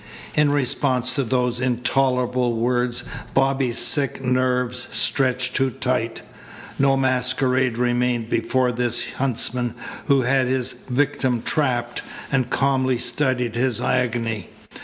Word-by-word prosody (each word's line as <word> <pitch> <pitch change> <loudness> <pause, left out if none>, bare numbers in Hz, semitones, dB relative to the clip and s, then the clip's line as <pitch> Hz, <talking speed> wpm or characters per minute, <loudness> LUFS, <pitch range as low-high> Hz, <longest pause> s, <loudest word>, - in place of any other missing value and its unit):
In 150 -1 +3
response 130 -2 +1
to 140 - 0
those 125 0 0
intolerable 125 0 +1
words 120 +1 0 0.3
Bobby's 135 -3 +1
sick 140 0 +2
nerves 125 -1 0
stretched 130 -1 +1
too 135 -1 +2
tight. 125 -3 -2 0.6
No 135 0 +3
masquerade 130 -1 +1
remained 120 -1 0
before 125 +1 +1
this 120 0 -1
huntsman 125 -2 0 0.3
who 140 -3 +3
had 130 +1 +2
his 130 0 -1 0.2
victim 130 -2 0
trapped, 120 -5 -1 0.3
and 130 -2 +1
calmly 130 -2 +1
studied 125 -3 0
his 120 -1 0
agony. 115 -4 -1
125 Hz, 115 wpm, -22 LUFS, 120-130 Hz, 0.6 s, In